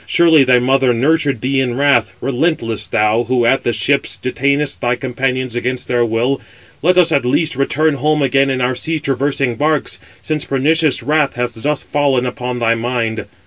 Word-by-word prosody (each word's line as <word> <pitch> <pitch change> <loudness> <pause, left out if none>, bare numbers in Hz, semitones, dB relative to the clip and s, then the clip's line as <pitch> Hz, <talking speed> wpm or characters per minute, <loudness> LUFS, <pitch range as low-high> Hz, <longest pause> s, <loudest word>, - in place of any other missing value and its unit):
surely 165 -4 +5
thy 130 -1 +4
mother 130 0 +2
nurtured 140 -1 +1
thee 135 +1 0
in 125 -2 -1
wrath: 140 -5 +2
relentless! 130 -5 -1
thou 110 +1 +1
who 125 0 +1
at 135 +3 +2
the - - -1
ships 140 +4 -1
detainest 140 +3 -1
thy 120 0 +1
companions 130 0 -3
against 125 +1 -3
their 120 -1 +1
will. 120 +4 -1 0.4
Let 180 +4 +2
us 175 -2 +4
at 140 - +2
least 150 +5 0
return 150 +3 +1
home 150 +2 0
again 135 +1 +2
in 130 -1 -1
our 125 +1 +1
sea 160 +6 -2
traversing 135 -3 -1
barks, 150 +1 -1 0.2
since 155 -2 -2
pernicious 150 +2 +1
wrath 150 -1 +1
has 120 0 -2
thus 145 +6 -2
fallen 140 -4 0
upon 125 0 -4
thy 115 -1 +1
mind. 115 -1 -2
135 Hz, 180 wpm, -16 LUFS, 120-145 Hz, 0.4 s, surely